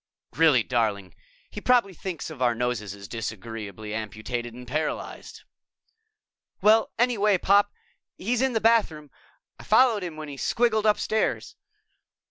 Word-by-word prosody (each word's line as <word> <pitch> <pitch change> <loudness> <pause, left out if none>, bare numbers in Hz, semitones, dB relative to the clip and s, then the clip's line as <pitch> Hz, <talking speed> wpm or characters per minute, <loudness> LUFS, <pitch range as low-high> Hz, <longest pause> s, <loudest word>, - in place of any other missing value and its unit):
"Really, 150 -7 +4
darling! 105 -6 -1 0.4
He 210 - -7
probably 240 -6 +3
thinks 175 -2 -6
of 145 -5 -10
our 120 -2 +2
noses 115 -5 -2
as 100 -1 -11
disagreeably 110 -1 -6
amputated 110 +3 -4
and 125 +1 -11
paralyzed." 155 +5 -4 1.2
"Well, 220 +1 +4
anyway, 215 -4 +3
Pop, 200 +3 +3 0.5
he's 235 +5 -1
in 265 -1 +1
the 225 - +1
bathroom. 190 -11 +2 0.5
I - - -11
followed 240 -5 +4
him 170 -4 -6
when 155 -1 -7
he 140 -1 -8
squiggled 220 - +1
upstairs." 215 +1 -1
155 Hz, 130 wpm, -25 LUFS, -, 1.2 s, Really